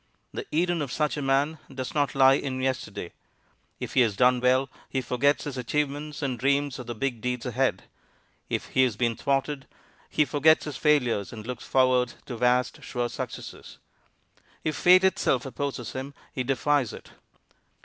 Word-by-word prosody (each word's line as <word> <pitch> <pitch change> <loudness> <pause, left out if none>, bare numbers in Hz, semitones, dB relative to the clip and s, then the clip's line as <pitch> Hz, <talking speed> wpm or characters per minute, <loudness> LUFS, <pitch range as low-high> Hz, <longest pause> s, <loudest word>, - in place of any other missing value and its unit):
The - - -5
Eden 175 +1 +1
of 140 -4 -3
such 150 +1 0
a 145 - -3
man 140 +3 +1
does 130 -2 -5
not 145 -2 0
lie 135 0 +7
in 135 -1 -2
yesterday. 130 -9 -3 0.7
If - - -5
he 130 - +5
has 110 -5 +2
done 125 +2 +4
well, 130 +2 +3 0.2
he 135 - -1
forgets 130 +3 +1
his 140 -3 -5
achievements 145 +3 -2
and 130 -4 -2
dreams 140 +1 +1
of 125 - -8
the 120 - -4
big 120 -1 -2
deeds 125 0 -2
ahead. - - 0 0.7
If - - -2
he 130 - +2
has 125 -5 +2
been 115 +1 0
thwarted, 135 +2 -1 0.4
he 150 - +2
forgets 150 +3 +4
his 150 -3 -5
failures 125 -9 +2
and 110 -2 -8
looks 125 0 -6
forward 130 -2 +3
to 125 - -6
vast, 125 +2 +1
sure 120 -1 -3
successes. 120 - -7 0.9
If 155 -1 -1
fate 185 +1 +6
itself 140 -9 +2
opposes 135 -3 -4
him, 135 +2 -6 0.2
he 130 - -2
defies 135 0 +1
it. - - -11
135 Hz, 170 wpm, -27 LUFS, 125-145 Hz, 0.9 s, lie